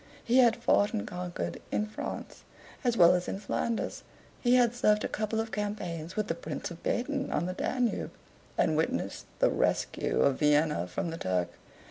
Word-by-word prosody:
He 245 +3 +4
had 235 -3 +6
fought 210 -3 +2
and 215 - -2
conquered 180 0 -4
in 210 - +1
France, 215 - -6 0.4
as 240 -2 +1
well 175 -1 +8
as 180 0 0
in - - -2
Flanders; 225 +3 -2 0.4
he 245 0 +4
had 245 -2 +4
served 210 -3 +3
a - - 0
couple 215 +1 -2
of 225 0 -2
campaigns 185 -6 -4
with 215 -1 -1
the - - 0
Prince 170 - -5
of 170 - -9
Baden 270 +3 -1
on - - 0
the 185 - -2
Danube, 245 +4 -1 0.5
and - - +3
witnessed - - -1
the - - +3
rescue - - 0
of 140 -2 +3
Vienna 150 - +3
from 125 - -3
the 165 - -5
Turk. 90 -1 0
210 Hz, 180 wpm, -30 LUFS, 170-235 Hz, 0.5 s, well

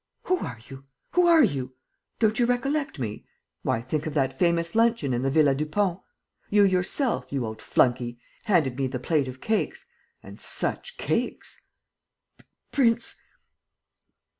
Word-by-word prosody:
"Who 365 0 +1
are 115 - -5
you? 135 0 -11 0.3
Who 360 -1 +4
are 330 -3 +7
you?" 130 - -1 0.4
"Don't 220 0 +2
you 240 - +3
recollect 275 - -1
me? 110 -6 -5 0.4
Why, 115 - 0
think 150 +5 -3
of 155 - -5
that 135 -2 +1
famous 170 +3 +1
luncheon 225 - +2
in 120 - 0
the 135 - +1
Villa 145 -1 +4
Dupont!... 170 +6 -1 0.5
You 205 0 +5
yourself, 195 +7 +1
you 135 -4 -1
old 110 0 -7
flunkey, 120 -1 +1 0.3
handed 155 - +2
me 135 - +1
the 130 0 -4
plate 140 +2 0
of 130 0 -8
cakes... 220 -1 -1 0.4
and - - -12
such - - 0
cakes!" - - -2 1.1
"Prince. 235 -4 +2
160 Hz, 145 wpm, -26 LUFS, -, 1.1 s, are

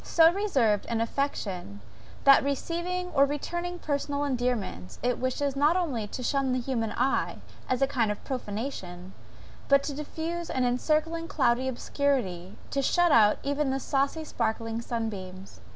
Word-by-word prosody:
So 330 -1 +5
reserved 270 - +1
is 230 -1 0
affection, 205 - -2 0.4
that, 275 0 +7
receiving 345 +6 -2
or 275 - +5
returning 345 +5 -3
personal 285 -2 -2
endearments, 245 - -2
it 245 0 +1
wishes, 265 +2 -1
not 300 +5 +3
only 265 - -1
to 250 - -6
shun 270 0 +1
the 255 - +1
human 235 -3 -2
eye, 260 +3 0 0.3
as 255 +1 +2
a - - +4
kind 235 -6 +1
of 210 - -6
profanation; 205 -7 -5 0.6
but 280 0 +5
to 290 - -3
diffuse 320 +3 -4
an 255 -1 0
encircling 310 +6 0
cloudy 255 -3 +2
obscurity 240 -9 -1
to 275 - +1
shut 350 +5 +3
out 210 -4 +6
even 285 0 0
the 265 +1 0
saucy 275 +4 0
sparkling 225 -4 -2
sunbeams. 200 -6 -5
265 Hz, 150 wpm, -28 LUFS, 225-290 Hz, 0.6 s, that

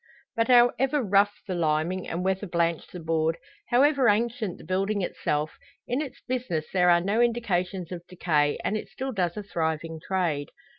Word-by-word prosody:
But 230 0 +1
however 255 +3 +4
rough 205 0 +2
the 190 - -2
limning, 170 +2 0
and 175 +2 -3
weather 190 +2 0
blanched 170 -1 -1
the 180 - -7
board 160 0 0 0.3
however 265 0 +4
ancient 220 -2 0
the - - -13
building 195 +3 0
itself 150 -3 -2 0.3
in 250 +4 0
its 270 -4 -7
business 245 -12 -2
there 180 -2 +4
are 170 0 +5
no 205 +6 +1
indications 190 -7 0
of 175 -1 -7
decay, 155 -5 +1
and 215 - 0
it 215 - -4
still 265 +1 -5
does 180 -6 -1
a 210 - -4
thriving 160 -3 -2
trade. 170 -7 -1
185 Hz, 170 wpm, -26 LUFS, 170-230 Hz, 0.3 s, are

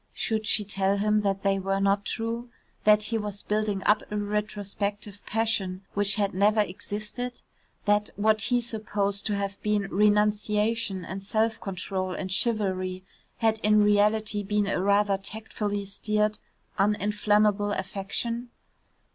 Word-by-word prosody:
Should 220 -1 -2
she 210 0 +3
tell 195 0 0
him 210 +1 +2
that 195 -1 -1
they 195 -1 +2
were 195 +1 -1
not 200 0 +2
true? 230 +1 -3 0.4
That 210 0 +6
he 225 +1 -1
was 205 -1 -5
building 210 -2 -1
up 210 0 +4
a 210 - -1
retrospective 205 0 -3
passion 205 -4 -1
which 205 0 +5
had 200 -2 0
never 205 +3 +3
existed? 210 +5 -5 0.4
That 205 0 +2
what 215 +1 +2
he 245 +3 +2
supposed 210 -3 -1
to 210 - 0
have 200 0 -3
been 210 -1 +1
renunciation 210 0 +1
and 190 +2 -6
self 220 +2 0
control 185 -1 -3
and 190 -1 -4
chivalry 185 -4 0 0.3
had 220 -1 +1
in 210 0 +4
reality 210 +1 +2
been 210 +1 0
a 195 -2 -1
rather 200 0 +2
tactfully 205 0 -3
steered 210 +1 0 0.4
uninflammable 210 0 +2
affection? 205 +5 -3
205 Hz, 140 wpm, -27 LUFS, 200-215 Hz, 0.4 s, That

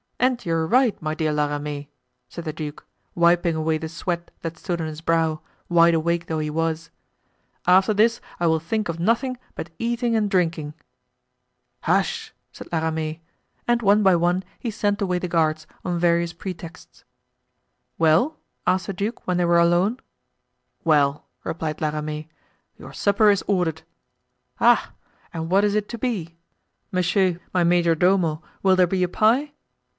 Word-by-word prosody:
"And 250 0 +1
you 165 - 0
are 160 -1 0
right, 245 +1 +3
my 155 -1 -2
dear 155 -2 0
La 150 0 +1
Ramee," 145 0 -5 0.4
said 170 - -8
the 155 - -3
duke, 150 -2 -7 0.3
wiping 170 -1 +3
away 160 0 0
the 160 -1 -5
sweat 170 +1 -4
that 165 0 -5
stood 175 0 -3
on 160 - -2
his 155 0 -6
brow, 165 -1 +1 0.3
wide 170 -1 +5
awake 170 +1 0
though 160 -1 -2
he 150 0 -2
was; 165 +1 -2 0.8
"after 190 +3 +5
this 230 +3 +3 0.2
I 175 - +1
will 160 0 +3
think 210 +7 -2
of 165 0 -3
nothing 235 +7 +1 0.2
but - - -6
eating 235 0 0
and 210 -2 +1
drinking." 165 -5 0 1.1
"Hush!" - - 0 0.2
said - - -11
La 165 - +1
Ramee; 160 0 -2 0.5
and 240 0 +2
one 205 +1 +5
by 190 -2 +5
one 175 +2 +1 0.2
he 240 - -3
sent 205 -1 -1
away 180 -2 +1
the 180 - -3
guards, 155 -2 +1 0.2
on 175 -2 -1
various 170 0 +2
pretexts. 170 -2 -9 0.9
"Well?" 165 - +3 0.3
asked 185 -1 +1
the 195 - -3
duke 205 +5 -4
when 180 -1 +1
they 175 - +2
were 170 0 +4
alone. 175 +8 +3 0.8
"Well!" 150 -3 +2 0.2
replied 160 -2 -4
La 155 - +1
Ramee, 150 0 -4 0.5
"your - - -11
supper 205 +1 +3
is 200 - 0
ordered." 180 -6 0 0.8
"Ah! - - +4 0.4
and 165 +1 -4
what 195 +2 +4
is 205 -1 +2
it 210 -1 -1
to 235 - -5
be? 195 -9 -3 0.5
Monsieur, 185 -1 +1
my 180 -1 +3
majordomo, 170 -1 +2 0.2
will 190 -1 +5
there 180 -1 +4
be 185 +1 0
a - - +2
pie?" 240 +10 +2
170 Hz, 165 wpm, -23 LUFS, 160-195 Hz, 1.1 s, wide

